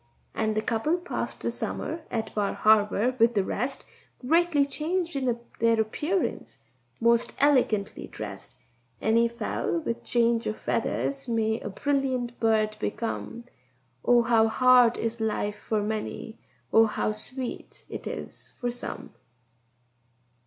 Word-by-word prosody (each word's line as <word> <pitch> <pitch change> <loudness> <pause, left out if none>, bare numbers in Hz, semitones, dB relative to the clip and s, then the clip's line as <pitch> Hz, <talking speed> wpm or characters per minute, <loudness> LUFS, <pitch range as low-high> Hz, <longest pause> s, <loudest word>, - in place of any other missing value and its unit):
And 220 -1 0
the 215 - 0
couple 240 +10 +1
passed 355 0 -4
the - - -1
summer 330 - -4
at 225 -2 -3
Bar 205 -2 0
Harbour 215 +3 +3
with 230 +1 +4
the 200 - +3
rest, 265 +7 -3 0.4
Greatly 330 -2 +4
changed 330 +4 -2
in 250 -4 0 0.2
their 230 0 +3
appearance 300 - -1 0.4
and 230 - +1
most 235 0 +3
elegantly 255 -8 +2
dressed. 105 -2 -8 0.4
Any 230 +2 +3
fowl 235 +8 -2
with 235 -8 -3
change 235 -1 +2
of 215 - -2
feathers 275 -1 -2
may 225 -1 +1
a - - -5
brilliant 255 0 -1
bird 215 -1 +2
become: 230 +2 -3 0.6
Oh, 240 -1 +5
how 225 -1 +4
hard 250 0 +5
is 230 0 -3
life 210 -1 -1
for 215 -2 +1
many! 220 +1 -4 0.3
oh, 225 0 +7
how 215 - -1
sweet 250 +4 -7
it - - -7
is - - -7
for 245 -1 -1
some! 245 - -6
230 Hz, 135 wpm, -27 LUFS, 220-260 Hz, 0.6 s, oh